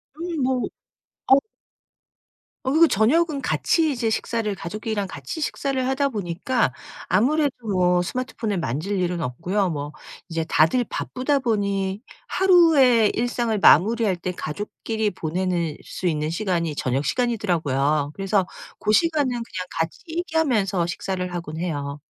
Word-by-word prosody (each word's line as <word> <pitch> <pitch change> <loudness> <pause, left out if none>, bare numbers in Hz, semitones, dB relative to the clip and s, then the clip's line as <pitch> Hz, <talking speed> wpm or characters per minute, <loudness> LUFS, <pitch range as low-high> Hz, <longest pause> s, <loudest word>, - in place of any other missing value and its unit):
음 335 -1 -4
뭐 255 -1 +1 0.7
어 270 - +8 1.2
어 260 - 0
그리고 325 +2 +6
저녁은 285 - +2
같이 320 +2 +1
이제 235 -3 -1
식사를 220 -1 -1
가족끼리랑 205 +3 -4
같이 145 - -7
식사를 275 -4 -1
하다 275 +1 +1
보니까 205 - -1 0.3
아무래도 285 +5 +2
뭐 180 -3 +2
스마트폰을 220 0 -3
만질 170 - -2
일은 175 -1 -1
없고요 180 +9 -1
뭐 145 -2 -4 0.3
이제 165 -1 -2
다들 160 - +4
바쁘다 275 +3 -1
보니 200 -5 -1 0.3
하루에 310 - +5
일상을 235 -2 0
마무리할 205 +2 +5
때 180 +1 -4
가족끼리 210 +6 -3
보내는 170 -1 -2
수 - - -7
있는 155 -2 0
시간이 170 -3 -1
저녁 135 +1 -1
시간이더라고요. 155 - 0
그래서 195 0 +1 0.3
고 210 - 0
시간은 305 +2 +3
그냥 230 -7 -4
같이 165 +1 -2
얘기하면서 270 - 0
식사를 180 0 -3
하곤 165 -2 -5
해요. 145 -4 -3
205 Hz, 310 characters per minute, -23 LUFS, 170-255 Hz, 1.2 s, 어